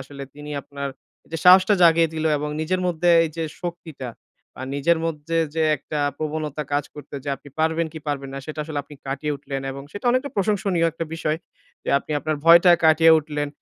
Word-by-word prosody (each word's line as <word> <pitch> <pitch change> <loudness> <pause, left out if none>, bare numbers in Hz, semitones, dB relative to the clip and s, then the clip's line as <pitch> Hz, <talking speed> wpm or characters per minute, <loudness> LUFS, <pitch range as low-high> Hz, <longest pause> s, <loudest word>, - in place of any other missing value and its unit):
আসলে 140 +1 -9
তিনি 150 0 -9
আপনার 140 0 -6 0.4
যে 165 - -3
সাহসটা 185 +3 +7
জাগিয়ে 165 -1 +6
দিলো 160 0 0
এবং 150 +1 -3
নিজের 180 +4 -1
মধ্যে 175 0 +2
এই 165 - -2
যে 165 - -1 0.2
শক্তিটা 170 -6 -6 0.5
বা - - -8
নিজের 160 +4 +2
মধ্যে, 165 0 -3 0.2
যে 160 - +1
একটা 150 +2 -5 0.2
প্রবণতা 155 -1 -3
কাজ 145 0 +1
করত 150 - -11
যে 145 - -5
আপনি 140 +2 -15
পারবেন 160 +1 +1
কি 160 - -7
পারবেন 140 -2 -3
না - - -4
সেটা 155 -1 -5
আসলে 150 -2 -4
আপনি 145 - -14
কাটিয়ে 140 +2 -2
উঠলেন 135 -1 -5
এবং 140 +1 -8
সেটা 205 - -8
অনেকটা 255 +3 0
প্রশংসনীয় 195 -4 +1
একটা 165 +1 -4
বিষয় 155 -1 -1 0.5
যে - - -7
আপনি 140 - -14
আপনার 155 +1 -2
ভয়টা 170 +2 +8
কাটিয়ে 160 +1 +6
উঠলেন। 150 -1 -3
155 Hz, 195 wpm, -23 LUFS, 145-170 Hz, 0.5 s, ভয়টা